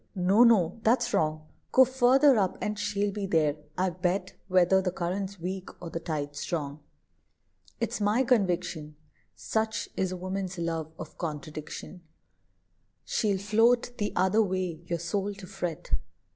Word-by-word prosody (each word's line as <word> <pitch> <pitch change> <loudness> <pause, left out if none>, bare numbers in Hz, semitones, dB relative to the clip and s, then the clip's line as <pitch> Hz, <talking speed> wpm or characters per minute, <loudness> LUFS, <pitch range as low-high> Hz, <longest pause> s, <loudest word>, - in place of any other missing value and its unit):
no, 195 +5 +5
no; 215 -5 +4
that's 240 +2 +2
wrong. 155 0 0 0.3
Go 260 - +7
further 260 +2 +5
up, 190 -2 0
and 210 0 -3
she'll 205 0 0
be 200 0 -3
there, 155 -4 +2 0.2
I 185 0 +1
bet, 180 +2 -1
Whether 185 0 +4
the 185 - 0
current's 190 +2 -3
weak, 185 +2 -4
or 170 -2 -7
the 165 - -3
tide 150 -3 -4
strong." 145 -1 -3 1.0
It's - - -2
my 210 +5 +3
conviction, 180 - 0 0.4
Such 220 0 -2
is 190 -1 0
a 185 - -4
woman's 185 0 -4
love 165 -2 -2
of 155 - -9
contradiction, 155 +2 -6 1.0
She'll 205 -3 +1
float 230 +5 +2
the 205 - 0
other 190 +4 +3
way, 185 -5 -1
your 170 - -1
soul 200 +4 -2
to 195 -1 -10
fret. 180 -4 -5
185 Hz, 145 wpm, -28 LUFS, 170-210 Hz, 1.0 s, Go